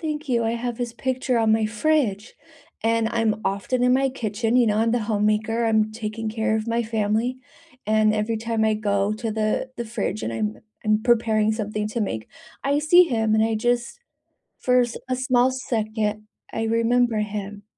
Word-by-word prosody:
Thank 305 Hz, -2 st, -4 dB
you. 235 Hz, -2 st, +1 dB
I 225 Hz, -, 0 dB
have 235 Hz, 0 st, -3 dB
his 240 Hz, -1 st, -3 dB
picture 255 Hz, -1 st, -1 dB
on 225 Hz, -1 st, +2 dB
my 220 Hz, 0 st, +3 dB
fridge, 220 Hz, -2 st, 0 dB, 0.5 s
and 225 Hz, 0 st, +2 dB
I'm 220 Hz, -2 st, 0 dB
often 200 Hz, +6 st, -1 dB
in 250 Hz, 0 st, +4 dB
my 270 Hz, +1 st, +3 dB
kitchen, 225 Hz, -2 st, -2 dB
you 250 Hz, -1 st, +5 dB
know, 210 Hz, -2 st, +1 dB
I'm 225 Hz, +1 st, +2 dB
the 245 Hz, -, +1 dB
homemaker. 215 Hz, +2 st, +1 dB
I'm 220 Hz, -1 st, +2 dB
taking 220 Hz, 0 st, -4 dB
care 220 Hz, 0 st, 0 dB
of 220 Hz, +1 st, -2 dB
my 230 Hz, 0 st, 0 dB
family, 220 Hz, +3 st, -1 dB, 0.5 s
and 215 Hz, 0 st, +3 dB
every 215 Hz, +1 st, -1 dB
time 225 Hz, 0 st, -1 dB
I 220 Hz, 0 st, +3 dB
go 205 Hz, -1 st, 0 dB
to 225 Hz, 0 st, -3 dB
the 220 Hz, +4 st, -1 dB
the 235 Hz, -, -3 dB
fridge 215 Hz, -2 st, -3 dB
and 115 Hz, -, -3 dB
I'm 110 Hz, -1 st, -2 dB, 0.3 s
I'm 215 Hz, 0 st, +2 dB
preparing 220 Hz, -3 st, +2 dB
something 210 Hz, -1 st, -3 dB
to 230 Hz, +2 st, -3 dB
make, 110 Hz, -, -3 dB, 0.3 s
I 280 Hz, +1 st, +1 dB
see 330 Hz, +4 st, +6 dB
him 220 Hz, -3 st, +1 dB
and 220 Hz, -, +3 dB
I 225 Hz, -1 st, 0 dB
just, 240 Hz, -, -1 dB, 0.6 s
for 250 Hz, 0 st, +4 dB
a -, -, +2 dB
s 255 Hz, +2 st, -4 dB
small 250 Hz, 0 st, +3 dB
second, 215 Hz, -4 st, -2 dB, 0.2 s
I 225 Hz, -, -2 dB
remember 230 Hz, +1 st, +2 dB
him. 205 Hz, -1 st, -4 dB
225 Hz, 190 wpm, -23 LUFS, 215-240 Hz, 0.6 s, see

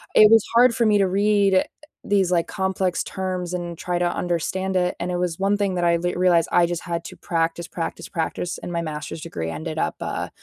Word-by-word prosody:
it 215 Hz, 0 st, +8 dB
was 225 Hz, -2 st, +7 dB
hard 245 Hz, +1 st, +6 dB
for 230 Hz, 0 st, +1 dB
me 210 Hz, -1 st, +4 dB
to 195 Hz, -, +4 dB
read 200 Hz, 0 st, +2 dB
eh 185 Hz, -, +5 dB, 0.4 s
these 195 Hz, -3 st, +1 dB
like, 170 Hz, -2 st, +2 dB
complex 190 Hz, -2 st, -1 dB
terms 185 Hz, -2 st, -4 dB
and 175 Hz, -2 st, -4 dB
try 175 Hz, -1 st, -2 dB
to 175 Hz, 0 st, +2 dB
understand 185 Hz, +2 st, -1 dB
it, 180 Hz, 0 st, +1 dB
and 175 Hz, +1 st, -2 dB
it 175 Hz, -, -1 dB
was 175 Hz, -2 st, -2 dB
1 200 Hz, +1 st, +2 dB
thing 200 Hz, -2 st, 0 dB
that 175 Hz, -, -1 dB
I 170 Hz, 0 st, +3 dB
th 175 Hz, +1 st, -2 dB
realized 175 Hz, -2 st, +3 dB
I 175 Hz, -, +5 dB
just 175 Hz, 0 st, -3 dB
had 170 Hz, -1 st, -3 dB
to -, -, -9 dB
practice, 165 Hz, 0 st, -2 dB
practice, 165 Hz, -, -5 dB
practice, 175 Hz, 0 st, -3 dB
and -, -, -7 dB
my 170 Hz, -1 st, -1 dB
Master's 155 Hz, 0 st, -5 dB
degree 80 Hz, -, -5 dB
ended 160 Hz, -, -5 dB
up, 75 Hz, -, -1 dB
uh, -, -, -4 dB
180 Hz, 230 wpm, -23 LUFS, 170-190 Hz, 0.4 s, it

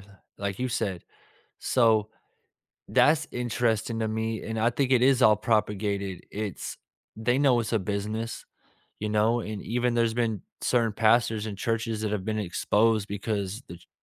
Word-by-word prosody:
th 100 Hz, +1 st, -17 dB, 0.3 s
like 100 Hz, -1 st, -3 dB
you 130 Hz, -, -1 dB
said. 100 Hz, -7 st, -2 dB, 0.6 s
So 110 Hz, -4 st, +3 dB, 0.8 s
that's 160 Hz, +1 st, +4 dB
interesting 115 Hz, -1 st, -1 dB
to 110 Hz, -, 0 dB
me 110 Hz, 0 st, -2 dB
and 110 Hz, 0 st, -4 dB
I 115 Hz, -, +4 dB
think 130 Hz, +1 st, 0 dB
it 125 Hz, -, +5 dB
is 130 Hz, -1 st, +4 dB
all 110 Hz, -2 st, +7 dB
propagated, 105 Hz, -3 st, -1 dB
it's 105 Hz, -2 st, -5 dB, 0.4 s
they 120 Hz, +4 st, +1 dB
know 135 Hz, -4 st, +4 dB
it's 115 Hz, -, -4 dB
a 115 Hz, -, +3 dB
business, 105 Hz, +4 st, -3 dB, 0.6 s
you 105 Hz, 0 st, -2 dB
know, 110 Hz, +3 st, +2 dB
and 105 Hz, -2 st, -5 dB
even 125 Hz, +1 st, 0 dB
there's 115 Hz, -1 st, +2 dB
been 115 Hz, -5 st, -1 dB, 0.2 s
certain 115 Hz, -3 st, +1 dB
pastors 110 Hz, 0 st, +3 dB
and 100 Hz, -2 st, -6 dB
churches 115 Hz, 0 st, -1 dB
that 110 Hz, -1 st, -1 dB
have 105 Hz, -3 st, -2 dB
been 110 Hz, +1 st, -2 dB
exposed 105 Hz, +2 st, +1 dB
because 105 Hz, 0 st, -3 dB
the 85 Hz, -, -8 dB
ch 85 Hz, -, -23 dB
110 Hz, 165 wpm, -27 LUFS, 105-120 Hz, 0.8 s, all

